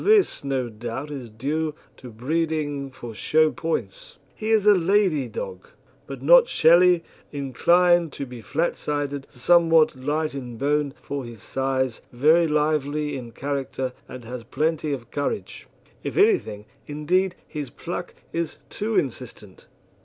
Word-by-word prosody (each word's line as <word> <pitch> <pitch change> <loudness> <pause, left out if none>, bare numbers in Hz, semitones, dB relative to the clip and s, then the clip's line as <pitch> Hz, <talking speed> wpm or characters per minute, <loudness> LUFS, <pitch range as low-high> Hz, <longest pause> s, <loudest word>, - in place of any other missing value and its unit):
This 415 - +3
no 135 -3 -1
doubt 120 +6 -6
is 130 -5 -6
due 150 +7 -2 0.2
to 125 - -10
breeding 145 +3 -2
for 120 -3 -9
show 155 +7 +3
points. 120 - -4 0.2
He 220 - -5
is 220 -2 +3
a 210 - +8
lathy 185 -5 +2
dog, 475 -1 -6 0.4
but - - -8
not - - +7
shelly, 175 - +5 0.3
inclined 170 +5 +3
to 140 - -5
be 125 -2 -9
flatsided, 145 -1 -2
somewhat 165 +3 +4
light 150 +4 -1
in 125 -4 -6
bone 145 +1 0
for 140 -1 -4
his 115 -4 -10
size, 130 -2 -1
very 155 +7 +4
lively 150 -1 0
in 120 -3 -7
character, 135 -2 -3 0.2
and 125 -2 -9
has 125 0 -6
plenty 155 +3 -1
of 120 -4 -5
courage. 145 -1 -3 0.4
If - - -4
anything, 385 - +2 0.2
indeed, 175 +5 0
his 150 -4 -5
pluck - - -6 0.2
is 165 -1 -2
too 215 +1 -2
insistent. 115 -7 -4
145 Hz, 140 wpm, -24 LUFS, 130-165 Hz, 0.4 s, a